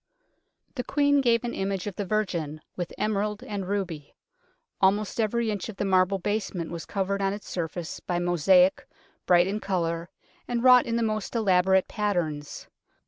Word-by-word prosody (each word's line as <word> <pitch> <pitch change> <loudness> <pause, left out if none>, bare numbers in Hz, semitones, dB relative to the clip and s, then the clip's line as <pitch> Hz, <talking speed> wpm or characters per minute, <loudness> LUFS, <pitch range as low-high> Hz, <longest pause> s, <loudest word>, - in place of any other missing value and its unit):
The 250 - -3
Queen 285 +1 +2
gave 235 -2 +2
an 240 - -3
image 195 -1 -2
of 205 -3 -5
the 205 - -3
Virgin, 170 -7 -2
with 175 -2 -4
emerald 210 +1 -1
and 205 -6 -5
ruby. 175 -8 -4 0.7
Almost 205 +3 +2
every 225 +1 +1
inch 205 +1 -4
of 205 - -8
the - - -1
marble 190 0 +3
basement 195 -3 -3
was 165 -2 -6
covered 200 0 -1
on 195 0 +1
its 205 0 -8
surface 170 -1 -4
by 175 - -3
mosaic, 175 +2 +3 0.4
bright 175 -1 +5
in 200 +3 -2
colour, 170 -4 -2 0.4
and 240 -1 -1
wrought 250 -1 +7
in 230 - -1
the 235 - +1
most 215 0 -2
elaborate 190 -3 +3
patterns. 175 -9 -2
195 Hz, 165 wpm, -26 LUFS, 175-215 Hz, 0.7 s, wrought